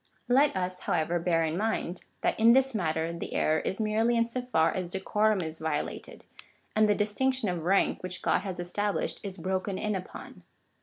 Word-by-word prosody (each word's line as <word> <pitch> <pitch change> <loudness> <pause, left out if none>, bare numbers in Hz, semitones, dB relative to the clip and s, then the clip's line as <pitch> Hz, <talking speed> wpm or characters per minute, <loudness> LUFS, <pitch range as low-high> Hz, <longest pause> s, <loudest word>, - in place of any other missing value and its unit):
Let 270 +2 +4
us, 185 0 -2
however, 170 +1 0
bear 165 -1 +1
in 160 0 -1
mind, 195 -3 -2 0.2
that - - 0
in 230 +1 +7
this 265 0 +3
matter 165 -4 -1
the 170 - -6
error 155 0 +2
is 190 - -3
merely 220 +2 +2
in 230 0 +2
so 250 +2 -3
far 205 -11 +2
as 185 -2 -3
decorum 205 +3 +1
is 160 0 -5
violated, 155 -2 -4 0.5
and 215 0 +4
the 205 - +4
distinc 220 +6 +1
tion 230 -6 -1
of 170 -3 -3
rank 195 +2 +2
which 185 0 -6
God - - +3
has 185 -3 -5
established, 200 +4 -2
is 195 -2 -6
broken 190 +2 -2
in 210 +1 -1
upon. 185 -2 -7
190 Hz, 195 wpm, -29 LUFS, 175-220 Hz, 0.5 s, in